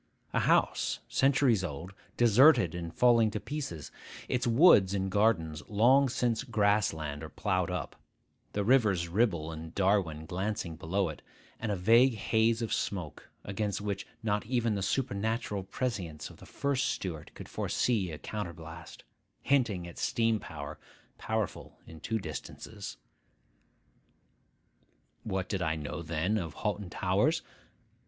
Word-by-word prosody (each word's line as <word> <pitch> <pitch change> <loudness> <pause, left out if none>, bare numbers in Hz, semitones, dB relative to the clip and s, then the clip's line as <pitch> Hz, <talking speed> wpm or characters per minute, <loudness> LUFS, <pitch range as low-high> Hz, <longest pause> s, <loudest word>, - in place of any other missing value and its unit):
A - - +2
house, - - +2
centuries 135 -6 +3
old, 90 +3 -5 0.2
deserted 120 - +6
and 85 -1 -5
falling 115 +1 +4
to 105 - -3
pieces, 135 - -5 0.4
its 125 0 0
woods 115 - +6
and 95 -1 -1
gardens 85 -8 +2
long 125 +6 +5
since 120 -1 0
grass 105 -5 +2
land 75 -2 -5
or - - -7
ploughed - - -1
up, - - -4 0.6
the 105 - 0
Rivers 105 -7 +3
Ribble 85 -5 +1
and 80 +1 -8
Darwen 95 -6 +1
glancing 95 -1 -3
below 90 +3 -1
it, 75 - -8 0.4
and 110 - -2
a - - +1
vague 115 +7 +5
haze 110 +2 +1
of 115 - -2
smoke, 90 -7 -3
against 100 +1 -2
which 100 -1 -4 0.2
not 105 -1 0
even 120 -3 +1
the 100 - -2
supernatural 110 -1 -1
prescience 95 - -4
of - - -15
the - - -14
first 140 -2 0
Stuart 80 -5 -4
could - - -9
foresee 105 -7 0
a 75 - -6
counter 105 -3 -5
blast, 80 0 -11 0.4
hinting 110 -11 +1
at 85 - -10
steam 115 -1 +1
power, - - -8 0.4
powerful 110 -3 -3
in 80 -1 -12
two 115 +7 -2
distances. 80 -8 -7 2.3
What 95 -1 -2
did 95 -3 -2
I 80 -1 0
know 75 +2 -5
then 85 +6 0
of 85 -4 -6
Hoghton 105 -3 -3
Towers? - - +1
100 Hz, 140 wpm, -30 LUFS, 85-115 Hz, 2.3 s, deserted